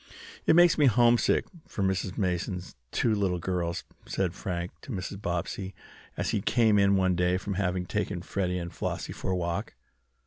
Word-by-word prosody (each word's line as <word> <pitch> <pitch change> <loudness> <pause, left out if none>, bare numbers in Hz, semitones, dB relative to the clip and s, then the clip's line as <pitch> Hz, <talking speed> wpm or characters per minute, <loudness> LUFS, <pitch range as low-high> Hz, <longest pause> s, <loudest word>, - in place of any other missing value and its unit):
"It - - +6
makes 175 -1 +6
me 145 - +6
homesick 120 +1 +4 0.2
for 100 - -3
Mrs. 95 -1 -1
Mason's 90 -1 -2 0.2
two 115 - +2
little 100 -4 +1
girls," 85 -1 -2 0.2
said 95 -3 -1
Frank 90 -2 -4
to - - -9
Mrs. 95 -1 -5
Bobbsey, 90 +1 -3 0.4
as - - 0
he - - 0
came 110 -1 +4
in 100 0 +4
one 95 -1 +3
day 90 +1 +2
from 100 +2 -4
having 90 -1 -1
taken 90 -1 -2
Freddie 90 -1 -1
and 85 -1 -5
Flossie - - -3
for - - -5
a 95 - +1
walk. 85 -1 -3
95 Hz, 175 wpm, -28 LUFS, 90-100 Hz, 0.4 s, It